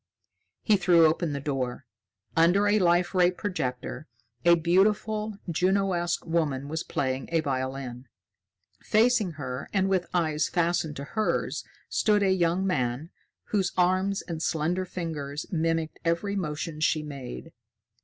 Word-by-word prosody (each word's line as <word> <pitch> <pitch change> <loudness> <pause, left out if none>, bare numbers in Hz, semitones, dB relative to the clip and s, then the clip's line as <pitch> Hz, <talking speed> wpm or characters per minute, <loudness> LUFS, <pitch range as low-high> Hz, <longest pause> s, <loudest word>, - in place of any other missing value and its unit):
He 215 -2 +4
threw 175 -3 +5
open 160 0 +1
the 140 - -3
door. 135 -2 -3 0.5
Under 175 +5 +4
a 210 +1 +4
Life 175 0 +3
Ray 180 -1 +5
projector, 155 -7 -4 0.4
a 170 0 +7
beautiful, 210 +5 +1
Juno 190 +3 +1
esque 175 0 -1
woman 150 -5 -1
was 160 +2 -3
playing 130 -1 -2
a 165 - +3
violin. 130 -3 -3 0.7
Facing 220 -4 +2
her, 130 -3 -6
and 195 -1 +1
with 185 -2 +1
eyes 155 -3 +1
fastened 170 -3 0
to 140 - -6
hers, 215 +9 -1 0.2
stood 210 -2 +2
a 190 - +3
young 180 0 +1
man, 140 -1 -1 0.4
whose 195 -4 0
arms 185 +2 +2
and 165 -3 -5
slender 170 +4 0
fingers 155 -5 -5
mimicked 165 -2 -1
every 170 +5 0
motion 155 -3 -3
she 155 0 +1
made. 140 +2 -8
170 Hz, 135 wpm, -27 LUFS, 150-185 Hz, 0.7 s, a